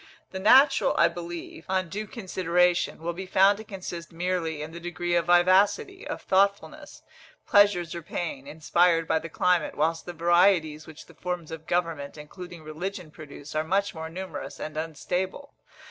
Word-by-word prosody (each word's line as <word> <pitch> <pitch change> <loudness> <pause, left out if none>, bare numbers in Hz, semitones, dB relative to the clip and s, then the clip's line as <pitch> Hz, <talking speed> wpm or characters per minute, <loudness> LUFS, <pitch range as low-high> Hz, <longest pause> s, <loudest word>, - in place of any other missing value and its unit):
The 190 - -5
natural, 265 +7 +5
I - - +5
believe, 170 -1 -8
on 185 -1 0
due 210 +6 -5
consideration, 180 -5 0
will 170 +1 -2
be 190 +2 -7
found 195 +2 +4
to - - -7
consist 180 -5 -7
merely 165 -3 -2
in 155 - -8
the 170 - -8
degree 175 0 -3
of 170 -1 +1
vivacity, 200 - +3
or - - -3
thoughtfulness, 200 +1 0 0.4
pleasures 195 -5 +4
or 170 - -5
pain, 155 -4 -5
inspired 165 +2 +2
by 160 - +2
the 165 - -8
climate, 180 +1 +1
whilst 165 +3 0
the 175 - -5
varieties 170 -2 +2
which 160 -1 -12
the - - -17
forms 180 -3 -5
of 160 -1 -8
government, 165 -5 -2
including 170 +2 -10
religion, 175 +2 -6
produce 145 -2 -11
are 155 0 0
much 195 +5 0
more 160 -1 -6
numerous 185 +3 -7
and 155 - -6
unstable. 180 - -4
175 Hz, 165 wpm, -26 LUFS, 160-190 Hz, 0.4 s, natural